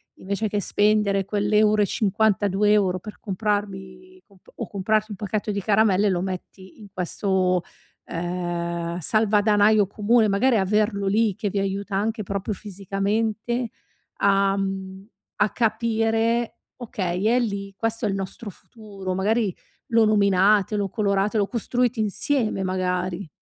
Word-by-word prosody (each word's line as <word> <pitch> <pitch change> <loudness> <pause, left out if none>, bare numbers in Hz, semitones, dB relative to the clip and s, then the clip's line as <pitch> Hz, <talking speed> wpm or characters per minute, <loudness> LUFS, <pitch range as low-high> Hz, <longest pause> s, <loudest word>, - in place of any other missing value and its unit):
invece 200 +3 -3
che 205 - -1
spendere 205 -1 +2
quell'euro 210 +1 +2
e - - +4
52€ 205 -2 +2
per 210 +4 -10
comprarmi 205 - -4
comp 195 -4 -25
o 230 - -5
comprarti 215 +3 0
un 205 - -6
pacchetto 210 +1 -2
di 200 0 -2
caramelle 205 -1 +3
lo 180 -2 0
metti 185 +1 -7
in 210 - -11
questo, 185 0 0 0.4
ehm, 170 0 -3
salvadanaio 210 +2 +3
comune; 215 +3 +2
magari 220 +5 +2
averlo 205 +1 +1
lì, 210 0 +2
che 210 -2 -2
vi 200 - -2
aiuta 195 +1 -3
anche 215 +2 -1
proprio 200 +2 -3
fisicamente 210 +5 -2 0.5
a, 195 0 +3
mhmm 195 0 -4 0.3
a - - +4
capire: 225 +1 0 0.2
"Okay 190 -6 -3
è 240 +3 +4
lì, 200 -4 -3
questo 225 +2 -1
è - - +1
il - - -1
nostro 195 +3 -5
futuro." 195 -2 -8
Magari 205 0 0 0.3
lo 230 -1 +4
nominate, 200 0 +3
lo 205 -1 0
colorate, 200 +1 0
lo 200 -2 +2
costruite 245 +1 -1
insieme 215 +1 0
magari. 185 0 -2
205 Hz, 135 wpm, -23 LUFS, 195-220 Hz, 0.5 s, e